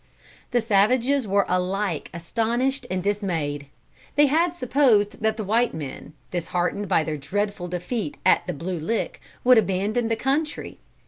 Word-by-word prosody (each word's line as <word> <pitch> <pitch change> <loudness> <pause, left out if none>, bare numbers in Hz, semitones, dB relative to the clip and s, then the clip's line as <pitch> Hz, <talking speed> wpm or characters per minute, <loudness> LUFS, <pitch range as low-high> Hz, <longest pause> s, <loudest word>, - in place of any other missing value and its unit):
The 245 -2 +2
savages 235 +5 +2
were 200 +1 +3
alike 185 -1 -1
astonished 235 +9 -1
and 185 -1 -2
dismayed. 165 -9 -2 0.5
They 295 +1 +6
had 330 +5 +2
supposed 250 -9 +2
that 220 0 +1
the 215 - -3
white 230 +4 +1
men, 150 0 -7 0.2
disheartened 180 +3 -1
by 160 - +3
their 155 -1 -3
dreadful 200 +4 -2
defeat 180 - -3
at - - +4
the - - -2
Blue 170 +4 -4
Lick, 220 +9 -2 0.2
would 250 -2 +7
abandon 215 +4 0
the 225 - +1
country. 285 +6 -2
205 Hz, 145 wpm, -24 LUFS, 180-245 Hz, 0.5 s, would